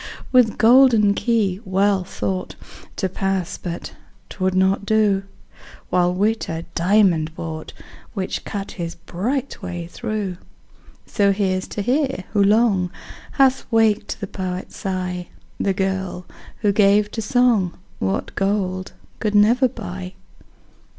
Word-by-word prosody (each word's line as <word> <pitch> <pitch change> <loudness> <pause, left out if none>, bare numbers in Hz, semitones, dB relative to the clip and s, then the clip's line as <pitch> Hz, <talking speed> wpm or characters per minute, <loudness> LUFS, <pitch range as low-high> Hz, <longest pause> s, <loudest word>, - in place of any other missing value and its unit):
With 250 -4 +4
golden 230 -3 +6
key 205 -4 +1
Wealth 195 -1 +1
thought 185 -1 -3 0.4
To 190 - -1
pass 195 0 -2
but 170 -2 -6 0.4
'twould 185 -1 -1
not 190 +2 +2
do: 210 -2 +2 0.7
While 180 -1 +3
Wit 215 +4 0
a 165 +1 -4
diamond 170 -4 +2
brought, 160 -2 -6 0.4
Which 190 -2 -3
cut 200 -2 -5
his 170 -2 -5
bright 240 +12 -3
way 175 -1 -5
through. 210 -1 -4 0.7
So 200 -3 +2
here's 190 -2 0
to 205 - -4
her, 265 -4 0
who 205 -2 +4
long 200 -3 +3 0.4
Hath 265 -2 +2
waked 225 -2 +2
the 200 - -3
poet's 185 -1 -5
sigh, 180 -2 -3 0.3
The 195 - +1
girl, 190 -1 -2 0.4
who 205 -2 +3
gave 205 +1 +4
to 225 - -3
song 225 -5 +2 0.2
What 95 0 -2
gold 190 -2 -1 0.3
could 210 -1 -1
never 235 +6 +5
buy. 185 -5 -7
195 Hz, 125 wpm, -21 LUFS, 185-215 Hz, 0.7 s, golden